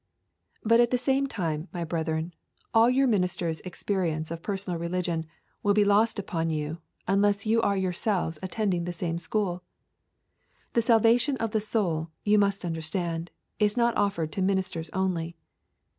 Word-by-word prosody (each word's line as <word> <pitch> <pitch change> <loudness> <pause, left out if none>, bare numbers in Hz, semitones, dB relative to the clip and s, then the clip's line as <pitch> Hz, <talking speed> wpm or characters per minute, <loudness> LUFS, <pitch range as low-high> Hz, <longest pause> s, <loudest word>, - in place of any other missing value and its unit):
3. 220 - -3
But, 230 0 +6
at 240 -1 +5
the 250 - +2
same 270 +2 +1
time, 165 - -3
my 175 -2 -3
brethren, 160 0 -2 0.4
all 225 +1 +6
your 265 +2 +3
ministers' 180 - 0
experience 175 -4 -2
of 165 0 -5
personal 190 -3 -3
religion 170 -1 -2 0.3
will 205 -1 +2
be 210 -1 +4
lost 210 +3 +3
upon 165 -5 -2
you 155 +1 -3 0.3
unless 200 +2 +2
you 225 +1 +3
are 200 -3 +1
yourselves 185 -3 -1
attending 185 -2 -1
the 175 - -3
same 170 -1 -3
school. 180 -1 -1 1.1
The 235 - +3
salvation 230 +4 +4
of 225 -2 -2
the 220 - +1
soul, 175 -7 -1
you 210 0 +4
must 200 -2 +1
understand, 165 +1 -3 0.3
is 210 +1 +2
not 235 0 +3
offered 170 -6 0
to 195 - -3
ministers 185 -4 0
only. 175 -3 -1
190 Hz, 160 wpm, -27 LUFS, 165-215 Hz, 1.1 s, But